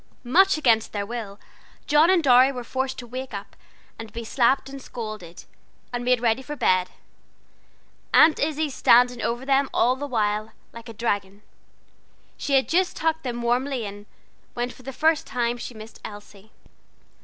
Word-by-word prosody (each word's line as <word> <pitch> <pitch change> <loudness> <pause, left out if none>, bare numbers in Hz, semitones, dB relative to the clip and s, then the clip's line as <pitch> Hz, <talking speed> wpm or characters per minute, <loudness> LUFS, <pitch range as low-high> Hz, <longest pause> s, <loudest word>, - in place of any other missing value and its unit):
Much 365 +9 +4
against 230 -7 +2
their 205 -1 -2
will 215 -3 -6 0.5
John 300 +3 +4
and 370 -3 +4
Dorry 255 0 +6
were 250 -2 -6
forced 260 +2 -3
to 245 - -7
wake 255 -1 -7
up, 200 0 -8 0.4
and 225 -1 -8
be 235 - -6
slapped 255 +4 +1
and 275 0 -9
scolded, 215 -9 -8 0.5
and 245 0 -3
made 250 0 +2
ready 230 +1 +1
for 295 +3 -7
bed, 185 -9 +2 1.2
Aunt 315 - +6
Izzie 305 0 -1
standing 245 -1 +4
over 240 +3 -2
them 275 0 +2
all 245 +2 +2
the 285 +2 -5
while, 215 -3 -1 0.2
like 230 +1 -11
a - - -8
dragon. 205 -3 -3 0.9
She 280 - -3
had 265 - +3
just 365 +2 +1
tucked 320 0 0
them 240 -3 -4
warmly 250 0 0
in, 205 +1 -9 0.5
when 245 +1 -2
for - - -15
the 265 +1 -7
first 315 +3 +1
time 240 -2 -1
she 240 - -7
missed 215 +1 -11
Elsie. 205 0 -11
245 Hz, 165 wpm, -24 LUFS, 220-270 Hz, 1.2 s, Dorry